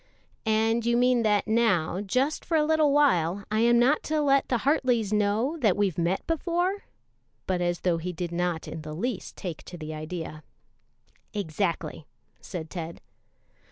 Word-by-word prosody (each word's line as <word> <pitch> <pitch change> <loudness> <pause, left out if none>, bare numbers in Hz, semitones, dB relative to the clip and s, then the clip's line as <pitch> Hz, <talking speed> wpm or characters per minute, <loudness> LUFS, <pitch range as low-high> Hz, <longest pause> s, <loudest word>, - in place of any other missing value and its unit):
"And 225 +1 +2
you 235 +1 +2
mean 250 0 +3
that 210 -2 +2
now, 205 -6 +2
just 255 +9 0
for 330 - +1
a 305 - +3
little 310 -2 +3
while, 200 - +3
I 215 - +1
am 235 +1 +5
not 260 +6 +4
to 310 0 0
let 275 -2 +3
the 245 - +2
Hartleys 245 -6 +1
know 215 +9 +1
that 215 -8 +3
we've 195 -5 +1
met 170 +3 0
before?" 350 +4 -1 0.6
but 185 -1 -1
as 175 0 -1
though 175 -2 +1
he 180 +2 -3
did 175 0 -4
not 175 -1 -1
in 160 - -6
the 155 0 -7
least 225 +3 -4
take 175 -5 -5
to 175 - -9
the 155 -1 -6
idea. 155 0 -6 0.9
"Exactly," 165 -4 -2 0.3
said 160 -3 -7
Ted. 170 -2 -6
205 Hz, 165 wpm, -27 LUFS, 175-255 Hz, 0.9 s, am